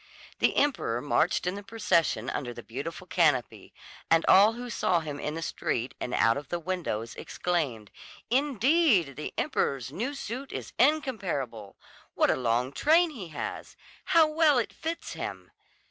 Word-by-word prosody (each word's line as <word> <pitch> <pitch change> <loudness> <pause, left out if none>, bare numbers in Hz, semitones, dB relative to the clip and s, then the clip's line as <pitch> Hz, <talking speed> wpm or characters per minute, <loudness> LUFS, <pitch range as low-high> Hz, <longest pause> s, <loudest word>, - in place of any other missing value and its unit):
The - - +2
emperor 260 - +1
marched 150 +7 +1
in 180 - 0
the 200 - -6
procession 185 - 0
under 120 -3 -4
the 120 - -9
beautiful 160 +9 -6
canopy, 150 -10 +1 0.4
and 165 0 +4
all 205 +4 +7
who 245 +1 -7
saw 180 -7 +1
him 145 -2 -6
in 150 +2 -3
the 165 - -4
street 125 -3 -2
and 125 - -4
out 115 +4 +3
of 145 - -7
the 175 - -1
windows 165 -11 -3
exclaimed: 140 - -3 0.4
"Indeed, 260 - +3
the 150 - -5
emperor's 130 -2 -1
new 245 - -3
suit 265 +1 -6
is - - -6
incomparable! 190 - 0 0.4
What - - +3
a - - +2
long 125 +1 0
train 320 - +3
he 215 - -8
has! 155 -2 -6 0.3
How 330 -1 +5
well 305 -2 +3
it 240 - -1
fits 330 +1 -5
him!" - - -6
175 Hz, 160 wpm, -28 LUFS, -, 0.4 s, all